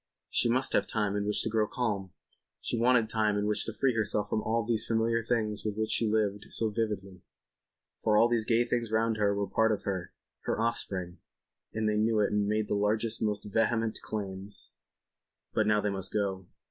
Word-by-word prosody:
She 120 - +2
must 130 +3 +1
have 100 - +2
time 105 -2 0
in 100 0 -1
which 105 - 0
to - - -1
grow 110 -1 +2
calm. 105 -6 -2 0.5
She - - -3
wanted 120 -1 +3
time 110 -2 +1
in 105 - 0
which 105 0 +1
to - - -3
free 130 +2 +1
herself 110 -1 0
from 110 - +1
all 115 0 0
these 115 -1 +2
familiar 115 0 +1
things 110 -3 -1
with 105 -1 -2
which 110 0 -1
she 115 - +2
lived 105 -1 0
so 110 -1 +1
vividly. 100 -4 -3 0.8
For 105 -1 +2
all 115 - +6
these 120 -2 +1
gay 115 0 +3
things 120 -2 -2
round 110 0 +1
her 100 -1 +2
were 100 0 0
part 110 +4 +2
of 105 - -2
her—her 95 +1 -5
offspring—and 100 0 -4
they 105 0 +1
knew 110 0 +2
it 105 - +2
and 105 -1 +1
made 105 0 0
the - - -1
largest, 105 +2 +1
most 105 -1 -1
vehement 110 +1 0
claims. 100 -1 -5 0.8
But 110 - +2
now 105 -1 +3
they 105 - 0
must 95 -1 0
go. 95 -3 -2
110 Hz, 200 wpm, -30 LUFS, 105-115 Hz, 0.8 s, all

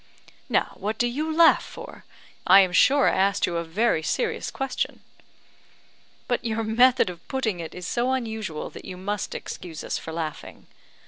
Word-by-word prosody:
"Now - - +1
what 210 +3 -3
do 240 - +2
you 295 +7 -2
laugh 325 +1 +6
for? - - -11 0.4
I 195 +2 +9
am 185 -2 +1
sure 275 +8 +5
I - - +2
asked 195 +1 +2
you 170 - -2
a 170 - -1
very 175 +2 +1
serious 455 - -1
question." 270 -1 -3 1.3
"But 245 - -1
your 225 -1 -1
method 245 +3 +4
of 170 -1 -15
putting 225 -9 -2
it 165 -1 -7
is 180 0 -7
so 240 +6 0
unusual 220 -10 -4
that - - -11
you 180 - -7
must 205 +2 -4
excuse 165 -4 -7
us - - -3
for 160 - -8
laughing." 160 -2 -6
220 Hz, 175 wpm, -25 LUFS, 180-250 Hz, 1.3 s, I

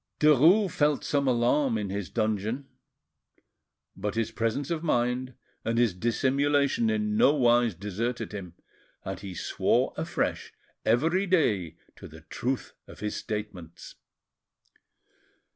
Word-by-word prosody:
Derues 160 - +5
felt 150 -2 +1
some 140 -1 0
alarm 125 +1 +2
in 100 -3 -3
his 100 -2 -4
dungeon, 110 +4 -2 1.3
but 105 +2 -3
his 115 -1 -1
presence 115 +7 -2
of 165 -2 -1
mind 125 -4 0 0.3
and 115 +1 -1
his 120 -5 +3
dissimulation 140 - +1
in 215 -1 0
no 215 -9 +5
wise 120 - +3
deserted 110 +5 -3
him, 90 -5 -8 0.5
and 95 -1 -4
he 95 -2 -8
swore - - 0
afresh - - -2 0.3
every 165 - +2
day 100 - +1 0.2
to - - -11
the 80 +1 -13
truth 125 - -4
of - - -13
his 105 0 -3
statements. 105 -6 -6
120 Hz, 125 wpm, -27 LUFS, 105-145 Hz, 1.3 s, Derues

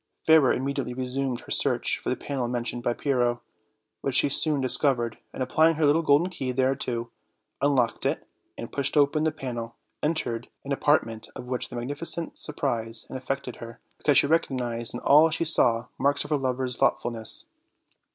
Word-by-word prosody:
Fairer 160 -5 +5
immediately 135 -1 -2
resumed 130 0 -2
her - - -13
search - - +2
for - - -4
the - - 0
panel 135 -4 -4
mentioned 120 0 -3
by 120 - 0
Pyrrho, 120 -2 0 0.6
which 135 -2 -2
she 140 - +4
soon 150 +1 +4
dis 130 -1 +5
covered, 120 -6 0
and 130 - -3
applying 160 +5 +3
her 155 0 +1
little 150 +3 +3
golden 160 +4 +2
key 130 -7 -4
thereto, 125 -2 -1 0.5
un 140 0 +2
locked 120 -3 0
it, - - -3 0.3
and, - - -7
pushing 140 +2 -1
open 150 +2 +2
the 160 - +2
panel, 120 -6 -6 0.3
entered 125 -7 -2 0.2
an 140 - -6
apart 145 +2 +2
ment 110 -1 -9
of - - -8
which 125 0 -3
the - - -9
magnificence 150 +7 -1
surprised 115 -7 -1
and 130 - -5
aifected 135 -1 -4
her, 115 0 -10 0.2
because 145 -3 +3
she - - +5
recognized 125 -7 -1
in - - -4
all 150 +3 +6
she 165 +1 -1
saw 120 -7 +3
marks 140 0 +1
of - - -10
her - - +3
lover's 130 -2 -2
thoughtfulness. 115 -2 0
130 Hz, 180 wpm, -26 LUFS, 120-145 Hz, 0.6 s, all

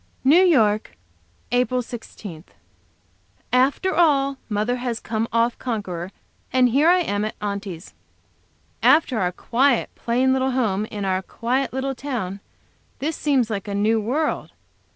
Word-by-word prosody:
New 300 +7 +6
York, 215 - +2 0.5
April 250 0 +1
16. 210 -8 -9 1.1
After 275 +9 +2
all, 275 -5 +3
mother 215 +4 0
has 245 -2 -3
come 225 0 -2
off 230 +1 +1
conqueror, 190 -8 -4 0.4
and 255 -1 +4
here 285 +7 +4
I 360 +1 +5
am 205 -10 -1
at 215 - -3
Aunty's. 200 -4 -5 0.9
After 290 -7 +4
our 180 -2 +1
quiet, 245 +6 +1
plain 255 +3 +1
little 265 0 +1
home, 215 -5 0
in 205 -2 -5
our 190 0 0
quiet 250 +7 -2
little 265 +1 -2
town, 240 -8 -4 0.6
this 310 +3 -2
seems 265 -6 +1
like 200 -1 -3
a 200 - -3
new 215 +2 +2
world. 285 +8 -1
240 Hz, 135 wpm, -22 LUFS, 210-265 Hz, 1.1 s, New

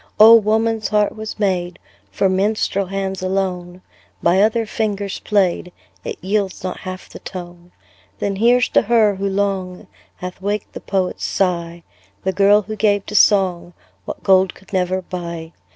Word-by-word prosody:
Oh! 220 +2 +10
woman's 220 0 +1
heart 210 -1 +1
was 220 0 -7
made 180 -4 -1 0.3
For 195 - +1
minstrel 195 0 0
hands 195 0 -3
alone; 185 -1 -3 0.4
By 180 +3 +4
other 225 +2 +2
fingers 205 -3 -3
played, 185 -3 0 0.3
It - - -5
yields 195 -1 -1
not 185 -1 -4
half 185 0 -7
the - - -11
tone. 175 -1 -9 0.5
Then 195 - -2
here's 245 +3 +4
to - - +4
her, 215 -3 +3
who 195 +1 -1
long 190 -2 -2 0.3
Hath 180 +1 -8
waked 205 +1 -3
the - - -8
poet's 190 -2 -2
sigh, 170 -3 -1 0.4
The 190 - 0
girl 200 +2 +4
who 215 +2 -6
gave 205 -2 +1
to 210 - -7
song 180 -4 +3 0.3
What - - -7
gold 190 -1 +3
could 195 - -19
never 185 0 0
buy. 170 -2 -6
195 Hz, 155 wpm, -19 LUFS, 180-210 Hz, 0.5 s, Oh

